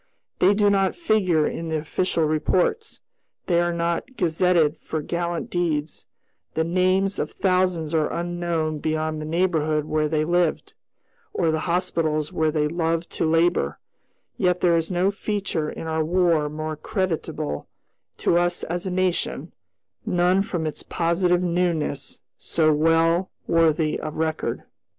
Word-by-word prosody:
They 195 Hz, +3 st, +5 dB
do 205 Hz, -1 st, +3 dB
not 195 Hz, -1 st, +2 dB
figure 190 Hz, -, +2 dB
in 165 Hz, -, -3 dB
the 160 Hz, -1 st, -1 dB
official 165 Hz, +2 st, -1 dB
reports; 175 Hz, -, 0 dB, 0.4 s
they 175 Hz, -1 st, +2 dB
are 175 Hz, 0 st, +1 dB
not 170 Hz, +9 st, -2 dB
gazetted 170 Hz, -2 st, +2 dB
for 160 Hz, -, -4 dB
gallant 170 Hz, 0 st, -3 dB
deeds; 160 Hz, -4 st, -2 dB, 0.5 s
the 160 Hz, -, +2 dB
names 185 Hz, +3 st, +1 dB
of -, -, -1 dB
thousands 180 Hz, -4 st, 0 dB
are 155 Hz, -2 st, +1 dB
unknown 170 Hz, -3 st, -2 dB
beyond 155 Hz, 0 st, -2 dB
the -, -, -5 dB
neighborhood 155 Hz, -3 st, +1 dB
where 155 Hz, 0 st, 0 dB
they 155 Hz, 0 st, +1 dB
lived, 175 Hz, -1 st, 0 dB, 0.6 s
or 165 Hz, -, +2 dB
the 160 Hz, -, 0 dB
hospitals 160 Hz, -4 st, 0 dB
where 160 Hz, -1 st, +1 dB
they 150 Hz, -1 st, +1 dB
loved 165 Hz, +1 st, -1 dB
to -, -, -1 dB
labor; 165 Hz, -, +2 dB, 0.6 s
yet 180 Hz, -1 st, +1 dB
there 175 Hz, -2 st, +4 dB
is 165 Hz, -1 st, 0 dB
no 185 Hz, +2 st, +1 dB
feature 195 Hz, -7 st, -2 dB
in -, -, -7 dB
our 160 Hz, 0 st, 0 dB
War 165 Hz, -3 st, +2 dB
more 155 Hz, +1 st, -4 dB
creditable 160 Hz, -, -3 dB, 0.5 s
to 170 Hz, -, +2 dB
us 175 Hz, 0 st, 0 dB
as 175 Hz, +3 st, -3 dB
a -, -, -1 dB
nation, 185 Hz, -1 st, -1 dB, 0.5 s
none 180 Hz, +2 st, +2 dB
from 175 Hz, -5 st, -3 dB
its 155 Hz, -, -3 dB
positive 175 Hz, +1 st, +1 dB
newness 175 Hz, -3 st, -1 dB, 0.2 s
so 155 Hz, -2 st, +2 dB
well 165 Hz, +3 st, +3 dB, 0.2 s
worthy 160 Hz, -2 st, +2 dB
of 155 Hz, -1 st, -5 dB
record. 160 Hz, 0 st, -2 dB
170 Hz, 145 wpm, -24 LUFS, 155-180 Hz, 0.6 s, They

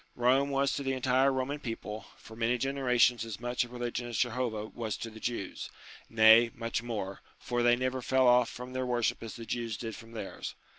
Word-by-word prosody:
Rome 130 Hz, +3 st, +3 dB
was 140 Hz, -1 st, +1 dB
to -, -, -2 dB
the 135 Hz, -1 st, -1 dB
entire 130 Hz, +1 st, +3 dB
Roman 135 Hz, +2 st, -2 dB
people, 110 Hz, -4 st, -6 dB
for 110 Hz, -, -13 dB
many 115 Hz, +2 st, +1 dB
generations 125 Hz, -3 st, +2 dB
as 115 Hz, -3 st, -6 dB
much 120 Hz, +1 st, 0 dB
a 120 Hz, -, -9 dB
religion 120 Hz, 0 st, -4 dB
as 120 Hz, -3 st, -4 dB
Jehovah 120 Hz, -3 st, -1 dB
was 110 Hz, -1 st, -4 dB
to 115 Hz, -, -6 dB
the 110 Hz, -, -11 dB
Jews; 115 Hz, -5 st, -4 dB, 0.4 s
nay, 115 Hz, +1 st, +7 dB
much 115 Hz, 0 st, -2 dB
more, 105 Hz, -5 st, -4 dB, 0.2 s
for 120 Hz, 0 st, -2 dB
they 120 Hz, 0 st, +5 dB
never 130 Hz, +1 st, -2 dB
fell 130 Hz, +1 st, +3 dB
off 125 Hz, -1 st, +5 dB
from 125 Hz, +1 st, -8 dB
their 130 Hz, 0 st, -2 dB
worship 120 Hz, -2 st, 0 dB
as 115 Hz, -2 st, -7 dB
the 115 Hz, -, -8 dB
Jews 115 Hz, -2 st, -3 dB
did 115 Hz, -3 st, -5 dB
from 115 Hz, 0 st, -12 dB
theirs. 110 Hz, -4 st, -6 dB
120 Hz, 205 wpm, -30 LUFS, 115-130 Hz, 0.4 s, nay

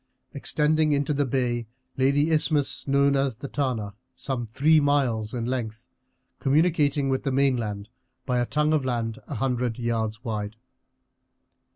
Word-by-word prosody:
Extending 155 Hz, 0 st, +2 dB
into 145 Hz, +1 st, 0 dB
the 145 Hz, -1 st, 0 dB
bay 120 Hz, -2 st, -1 dB, 0.3 s
lay 130 Hz, 0 st, +3 dB
the 145 Hz, +3 st, +2 dB
isthmus, 150 Hz, -3 st, +1 dB
known 140 Hz, 0 st, +3 dB
as 135 Hz, -4 st, 0 dB
the 140 Hz, -, -6 dB
Tana, 125 Hz, -8 st, -2 dB, 0.2 s
some 130 Hz, -4 st, -3 dB
three 150 Hz, +8 st, +4 dB
miles 130 Hz, -7 st, +1 dB
in 120 Hz, -2 st, -3 dB
length, 120 Hz, -2 st, -4 dB, 0.5 s
communicating 145 Hz, -1 st, +2 dB
with 135 Hz, -1 st, 0 dB
the 135 Hz, -, -2 dB
mainland 120 Hz, -7 st, 0 dB, 0.4 s
by 125 Hz, -2 st, 0 dB
a 120 Hz, -, 0 dB
tongue 150 Hz, +1 st, +1 dB
of 150 Hz, -3 st, +2 dB
land 115 Hz, -3 st, -2 dB
a 145 Hz, -, -5 dB
hundred 125 Hz, -1 st, -1 dB
yards 115 Hz, -1 st, -2 dB
wide. 105 Hz, -3 st, -4 dB
130 Hz, 150 wpm, -25 LUFS, 115-145 Hz, 0.5 s, three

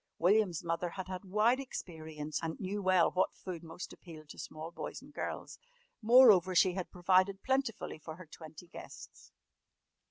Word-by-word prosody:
William's 180 Hz, -1 st, +2 dB
mother 170 Hz, +1 st, -1 dB
had 185 Hz, +2 st, -6 dB
had 185 Hz, 0 st, -6 dB
wide 215 Hz, +6 st, +2 dB
experience 155 Hz, -, -6 dB
and 160 Hz, -1 st, -4 dB
knew 200 Hz, +2 st, -3 dB
well 185 Hz, -2 st, +4 dB
what 185 Hz, -, 0 dB
food 180 Hz, -4 st, -7 dB
most 165 Hz, +1 st, -8 dB
appealed 155 Hz, -4 st, -13 dB
to -, -, -11 dB
small 155 Hz, +2 st, -7 dB
boys -, -, -6 dB
and -, -, -16 dB
girls. -, -, -5 dB, 0.4 s
Moreover 215 Hz, -6 st, +7 dB
she 180 Hz, +1 st, +5 dB
had 185 Hz, -1 st, -4 dB
provided 185 Hz, +2 st, +2 dB
plentifully 265 Hz, -, -1 dB
for 155 Hz, +1 st, -8 dB
her 185 Hz, +1 st, -11 dB
twenty 160 Hz, +1 st, -12 dB
guests. 170 Hz, -, -12 dB
180 Hz, 160 wpm, -33 LUFS, 165-195 Hz, 0.4 s, Moreover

